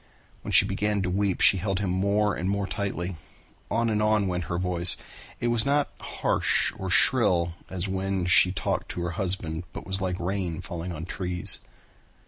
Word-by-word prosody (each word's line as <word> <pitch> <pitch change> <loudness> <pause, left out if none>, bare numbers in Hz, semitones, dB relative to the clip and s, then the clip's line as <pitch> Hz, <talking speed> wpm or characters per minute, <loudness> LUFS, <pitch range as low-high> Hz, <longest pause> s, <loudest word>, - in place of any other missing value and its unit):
When - - -6
he - - +6
began 105 -1 -1
to 90 - -2
weep 100 0 -1
she 95 - +6
held 95 +1 -2
him 95 -2 -2
more 100 +2 +1
and 90 - -3
more 100 0 -1
tightly. 95 -3 -4 0.5
On 115 +1 0
and 105 -1 0
on 105 -2 +2
went 90 -2 -3
her 85 +2 -3
voice. 90 -1 +3 0.4
It 120 - -1
was 120 -2 +2
not 145 +1 0
harsh - - 0
or 95 - -4
shrill 90 -6 +5 0.2
as 95 +1 -3
when 95 -1 -2
she 90 +1 +5
talked 95 - -3
to 90 - -5
her 85 0 -3
husband, 90 -3 -2
but - - -8
was 95 +1 -2
like 90 -1 -2
rain 90 -2 -3
falling 85 +1 -6
on 80 0 -6
trees. 90 -1 +2
95 Hz, 185 wpm, -26 LUFS, 90-100 Hz, 0.5 s, he